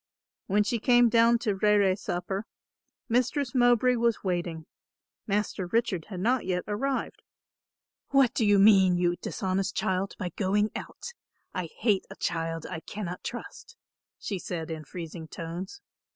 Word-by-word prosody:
When 210 +1 +3
she 230 +3 -1
came 240 +1 +5
down 230 +1 +5
to 210 - +2
rere 200 -1 +3
supper, 190 +2 -4 0.6
Mistress 250 +2 0
Mowbray 245 0 +4
was 235 -1 +1
waiting. 175 -4 -2 0.6
Master 200 -2 -1
Richard 185 -5 0
had 185 -4 -6
not 245 +4 +2 0.3
arrived. 260 +6 -2 0.9
"What 270 -3 +4
do 235 - 0
you 205 -1 +5
mean, 195 -3 +6
you 175 0 +2
dishonest 190 +1 -2
child, 190 +1 -1
by 180 - -3
going 205 +3 0
out? 480 - -7 0.4
I 180 -2 -3
hate 210 -4 +1
a - - -9
child 165 -1 -2
I - - -5
cannot 180 0 -6
trust," 400 - -8 0.4
she 195 -3 -4
said 165 -2 -5
in 155 -1 -6
freezing 165 0 -7
tones. 175 - -7
200 Hz, 140 wpm, -28 LUFS, 180-235 Hz, 0.9 s, mean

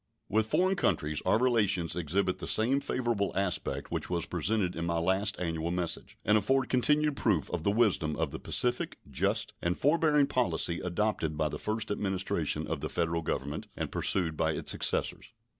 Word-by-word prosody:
With 110 +2 +1
foreign 185 +9 +2
countries 75 - 0
our 95 - +4
relations 100 -9 +1
exhibit 90 +3 -1
the - - -6
same 125 +5 +3
favorable 120 -7 -1
aspect 95 -2 -2
which - - -2
was 85 -2 0
presented 90 +2 -1
in 85 - -3
my 85 -1 0
last 95 +5 +1
annual 80 -1 -2
message, 90 -1 -2
and 105 +1 +4
afford 135 +5 +1
continued 150 +3 +2
proof 100 - 0
of 90 - -2
the 90 - +1
wisdom 100 -8 +2
of 80 -2 -2
the - - -6
pacific, 125 0 0
just, 65 - 0
and 85 +1 -1
forbearing 150 -1 +3
policy 120 -10 0
adopted 90 -4 -1
by 75 -1 +1
the - - -6
first 110 0 -1
Administration 95 -2 -1
of - - -3
the - - -3
Federal 85 0 -1
Government 75 -1 -3
and - - -3
pursued 85 -5 +2
by - - +1
its - - -1
successors. - - 0
95 Hz, 175 wpm, -30 LUFS, 85-120 Hz, -, our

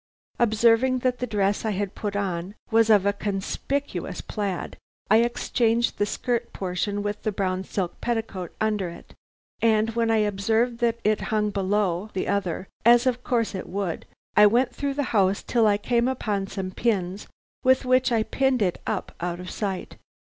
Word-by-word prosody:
Observing 235 +3 +4
that 250 0 0
the 250 - -2
dress 200 -2 0
I 220 - 0
had 200 -1 -2
put 205 -2 -4
on 190 -1 -2 0.2
was 225 0 +4
of 205 -3 +5
a 200 - +3
conspicuous 205 +8 -3
plaid, 200 -4 -4 0.3
I 215 - +8
exchanged 235 0 +1
the 205 - +2
skirt 240 +2 -2
portion 200 +2 -2
with 205 0 -3
the 215 - -1
brown 190 -1 -1
silk 185 -3 -4
petticoat 220 -7 -3
under 210 -4 0
it, 170 - -12 0.5
and 225 -1 +3
when 230 0 0
I 225 - +3
observed 225 +4 0
that 235 -1 +1
it 215 0 +2
hung 210 -1 +1
below 195 -1 0
the 190 - -2
other, 190 -2 -1 0.2
as 240 +2 +6
of 250 -1 0
course 230 -4 0
it 190 - -6
would, 190 -2 -3 0.3
I 210 0 +8
went 245 +3 +2
through 280 -1 -2
the 290 - 0
house 195 -2 +2
till 230 -3 +2
I 205 -1 +3
came 235 +3 +1
upon 210 -6 -1
some 190 -1 -5
pins 195 -3 -1 0.4
with 260 +1 +4
which 255 0 +3
I 225 -2 +2
pinned 265 -1 +1
it 180 -3 -1
up - - -3
out 175 0 -2
of 180 0 -7
sight. 195 -3 -4
210 Hz, 180 wpm, -25 LUFS, 195-235 Hz, 0.5 s, I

